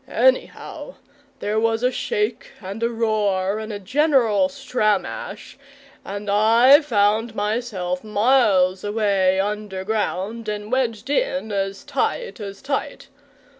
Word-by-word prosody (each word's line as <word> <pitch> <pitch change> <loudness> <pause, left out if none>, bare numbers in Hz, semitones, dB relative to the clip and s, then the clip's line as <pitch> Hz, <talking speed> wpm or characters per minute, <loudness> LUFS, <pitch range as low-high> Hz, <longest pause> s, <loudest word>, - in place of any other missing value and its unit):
Anyhow - - 0 0.5
there 215 +1 0
was 225 +1 0
a 250 - +3
shake 470 - -2
and 200 +2 -7
a 230 - +1
roar 210 -4 0
and 220 0 -6
a 205 - -4
general 260 +2 +2
stramash, 255 -6 -2 0.4
and 205 +1 -6
I 230 +8 +6
found 220 -3 +1
myself 205 -4 -2
miles 205 -4 +3
away 200 -3 +1
underground 210 +1 -3
and 210 +1 -5
wedged 255 0 -1
in 275 - -1
as 195 -1 -2
tight 475 - -2
as 200 0 -8
tight. 280 +1 -4
215 Hz, 115 wpm, -22 LUFS, 200-250 Hz, 0.5 s, I